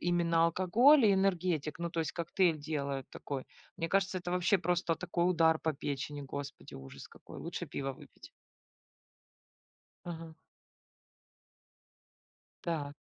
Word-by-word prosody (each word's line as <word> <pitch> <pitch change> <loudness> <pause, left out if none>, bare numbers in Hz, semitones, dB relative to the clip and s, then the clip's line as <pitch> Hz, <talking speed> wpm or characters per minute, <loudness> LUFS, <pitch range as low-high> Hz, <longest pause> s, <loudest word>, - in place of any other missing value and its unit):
именно 170 -1 +2
алкоголь 225 - +5
и 200 - +6
энергетик, 180 -5 0
ну, 170 - -2
то 165 - -1
есть, 160 - -2
коктейль 170 -1 +1
делают 140 -3 -3
такой. 135 -2 -5 0.3
Мне 165 -2 -2
кажется, 190 0 +1
это 175 0 -5
вообще 180 +2 +3
просто 175 -1 +1
такой 175 0 0
удар 160 -2 +4
по 160 - 0
печени, 145 +1 -4
господи, 140 +1 -7
ужас 65 0 -10
какой. - - -12
Лучше 170 +1 -5
пива 135 -2 -3
выпить. - - -15 1.8
Ага. 165 -1 -6 2.3
Та. 150 -4 -2
165 Hz, 125 wpm, -32 LUFS, 145-180 Hz, 2.3 s, и